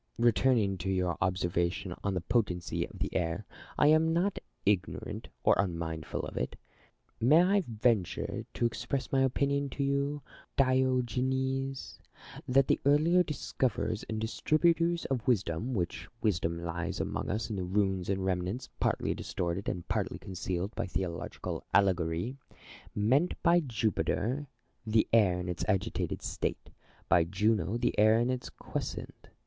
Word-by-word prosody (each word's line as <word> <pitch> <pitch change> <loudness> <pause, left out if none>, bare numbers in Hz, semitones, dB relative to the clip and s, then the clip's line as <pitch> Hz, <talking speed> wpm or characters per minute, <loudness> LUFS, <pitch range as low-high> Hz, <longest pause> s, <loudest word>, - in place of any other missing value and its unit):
Returning 115 -4 +3
to 95 +3 -2
your 90 -3 +1
observation 90 0 0
on 100 -1 0
the 90 - -1
potency 90 -4 0
of - - -13
the - - -3
air, 85 +4 -1 0.3
I - - +4
am 160 +1 +4
not 180 +4 +1 0.3
ignorant 100 -3 -1 0.2
or - - +6
unmindful 85 -4 -2
of - - -7
it. - - -2 0.6
May 150 +9 +6
I 195 +1 +3
venture 110 -7 0
to 120 - +1
express 130 +3 -2
my 135 - +3
opinion 140 +2 +1
to 140 - -2
you, 140 +1 0 0.3
Diogenes, 130 +1 +1 0.5
that 135 +2 +4
the - - +3
earlier 155 +6 +5
dis 150 -6 -4
coverers 110 -3 0
and 110 -1 -2
distributors 165 +8 +2
of 130 -2 -2
wisdom 110 +1 +1
(which 85 -4 -2
wisdom 85 -5 0
lies 85 0 -3
among - - -2
us 110 +3 -2
in 95 -3 -3
ruins 95 -3 +1
and 95 -1 0
remnants, 95 +6 -2
partly - - +1
distorted 85 +3 -3
and 90 -1 -4
partly - - -1
concealed 95 +1 -4
by - - -3
theological 90 -2 -4
allegory) 90 +4 +2 0.6
meant 130 +12 +2
by 170 +1 +6
Jupiter 120 - -1 0.4
the 110 -1 +2
air 95 -6 +5
in 90 - -4
its 90 -1 -3
agitated 95 -3 -1
state; - - -3 0.4
by 85 - +5
Juno 105 +4 +1
the 120 - +1
air 110 +1 +6
in 120 +2 +2
its 130 0 -4
quiescent. - - -6
110 Hz, 145 wpm, -31 LUFS, 90-130 Hz, 0.6 s, or